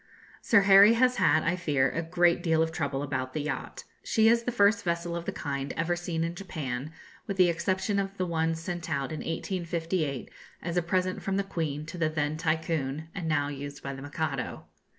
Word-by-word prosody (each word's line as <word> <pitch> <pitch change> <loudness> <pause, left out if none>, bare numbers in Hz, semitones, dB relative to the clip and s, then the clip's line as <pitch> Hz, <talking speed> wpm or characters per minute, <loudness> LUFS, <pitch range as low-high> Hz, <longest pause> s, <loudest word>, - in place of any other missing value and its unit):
Sir 225 -3 +5
Harry 195 +2 +8
has 250 +2 +3
had, 170 -4 +4
I 170 +2 +1
fear, 145 -7 +1
a 165 - -2
great 175 +1 +2
deal 160 -1 +3
of 160 - -2
trouble 140 -3 -2
about 130 -2 -3
the 155 - 0
yacht. 150 - -4 0.2
She 220 -1 +3
is 235 +1 +5
the 245 - 0
first 205 -2 +3
vessel 170 0 -1
of 170 0 -4
the - - -2
kind 140 -2 -4
ever 165 +2 +1
seen 175 -2 -2
in 165 +1 -2
Japan, 150 -7 -5 0.4
with 200 -2 -3
the 180 -2 +6
exception 190 +4 0
of 195 0 -3
the 185 - 0
one 165 -1 0
sent 170 0 -5
out 140 -1 -1
in 155 - -4
1858 165 -4 -2 0.3
as 170 0 -3
a 175 - +3
present 185 +2 -1
from 195 0 -1
the 200 - +1
Queen 155 -6 -3
to 175 +3 -8
the 160 -2 +2
then 150 -1 -1
Tycoon, 160 -2 -1
and 180 -4 -4
now 145 -2 +1
used 145 0 -7
by 140 - -4
the 135 - -8
Mikado. 145 -1 -3
165 Hz, 210 wpm, -28 LUFS, 150-185 Hz, 0.4 s, Harry